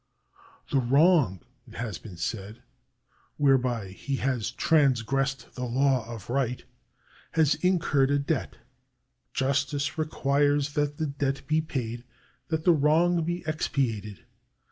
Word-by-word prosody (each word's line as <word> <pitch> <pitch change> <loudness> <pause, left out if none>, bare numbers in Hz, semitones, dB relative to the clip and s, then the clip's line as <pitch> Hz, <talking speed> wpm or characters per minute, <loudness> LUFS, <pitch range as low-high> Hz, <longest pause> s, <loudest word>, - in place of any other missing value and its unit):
" - - -25
The 135 - +3
wrong," 135 - +3 0.3
it - - -14
has 110 -8 -4
been 95 -6 -11
said, 105 +5 -5 0.4
" 125 - -39
whereby 125 -7 +2
he 135 +8 -4
has 130 -4 -1
transgressed 135 -1 +1
the 125 - -4
law 125 -1 +1
of 110 -4 -8
right, 125 -1 -1 0.7
has 160 -2 +4
incurred 165 -7 +2
a 145 - +3
debt. 145 +3 -2 0.7
Justice 140 +4 -1
requires 145 -1 +1
that 145 0 -1
the 160 - -1
debt 140 -1 -2
be 155 +3 +2
paid, 120 -6 -4 0.4
that 160 -1 -2
the 175 - +6
wrong 165 +3 +3
be 175 +2 -3
expiated. 115 -9 -2
135 Hz, 130 wpm, -27 LUFS, 120-150 Hz, 0.7 s, the